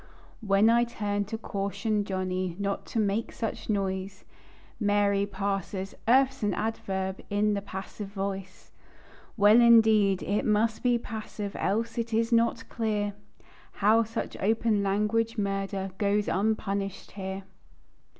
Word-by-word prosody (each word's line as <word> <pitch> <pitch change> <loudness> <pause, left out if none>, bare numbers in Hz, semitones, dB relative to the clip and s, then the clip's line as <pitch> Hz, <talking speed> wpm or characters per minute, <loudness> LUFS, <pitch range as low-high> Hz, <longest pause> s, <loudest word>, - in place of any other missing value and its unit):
While 205 +1 +4
I 235 +1 +4
turn 205 -3 -2
to 220 +3 -4
caution 200 0 -2
Johnny 185 -2 -2
Not 200 0 -3
to 225 - -2
make 210 +2 0
such 225 -1 -5
noise; 190 -2 -2 0.6
Mary 205 -1 +2
parses: 195 -1 -3
"Earth's 265 +2 +4
an 205 -3 0
adverb, 190 -3 -3
In 205 +1 +2
the 200 - -1
passive 195 +1 -7
voice." 195 -1 -5 0.7
Well, 210 +3 +7
indeed, 220 -4 +5
it 205 +2 0
must 220 +1 +1
be 245 -1 +3
passive, 215 -3 -6
Else 225 +3 -1
it 230 -1 -2
is 230 +1 +1
not 230 0 +2
clear 210 -3 -1 0.6
How 215 +3 +4
such 225 +1 -5
open 220 0 +2
language 210 +3 0
murder, 195 -1 -2
Goes 205 0 +1
unpunished 195 -1 -1
here. 190 0 -5
205 Hz, 130 wpm, -28 LUFS, 195-225 Hz, 0.7 s, Well